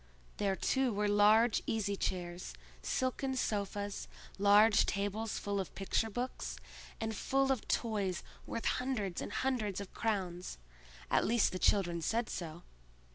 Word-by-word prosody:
There, 195 -2 +1
too, 265 +4 +1
were 210 0 0
large 210 +3 +5
easy 205 -2 0
chairs, 175 - -3 0.3
silken 260 - -1
sofas, 205 -3 -2 0.3
large 205 +1 +6
tables 205 +2 -1
full 200 0 -2
of 190 - -5
picture 195 +3 0
books, 245 +4 -4 0.4
and 220 0 -2
full 270 +5 +1
of 260 -5 -1
toys 200 -6 0 0.2
worth 230 - -4
hundreds 220 -9 -1
and - - -5
hundreds 225 -8 -1
of 200 -2 -8
crowns—at 65 - -3
least 235 0 +3
the 185 - -4
children 175 -4 +2
said 225 +7 0
so. 170 0 -6
205 Hz, 130 wpm, -34 LUFS, 185-225 Hz, 0.4 s, large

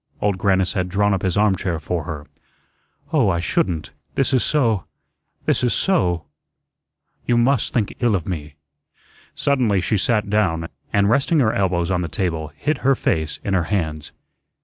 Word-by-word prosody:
Old 100 -2 0
Grannis 95 -2 +2
had 90 -1 -1
drawn 105 +2 +2
up 95 - -1
his 95 -1 0
armchair 95 -4 +1
for 80 0 -3
her. 75 -3 -6 0.9
"Oh, 135 -10 +4
I 85 -2 +1
shouldn't. 85 -1 -1 0.2
This 135 0 +1
is 130 - +4 1.0
this - - +1
is 120 - +2
SO 90 - +1 1.0
You 120 - +3
must 120 +1 +2
think 110 -5 0
ill 120 -4 +2
of 85 -4 -3
me." 75 -5 -5 0.8
Suddenly 125 -8 +2
she 105 +4 0
sat 105 0 +1
down, 90 -6 0 0.2
and 100 0 +3
resting 140 +8 +2
her 120 -7 +3
elbows 90 -2 0
on 90 -1 +1
the 85 - -2
table, 80 -3 -2
hid 150 -2 -1
her 135 +1 +3
face 80 -9 -1
in 100 - -1
her 90 -3 +2
hands. 80 -6 -2
95 Hz, 165 wpm, -21 LUFS, 85-115 Hz, 1.0 s, Oh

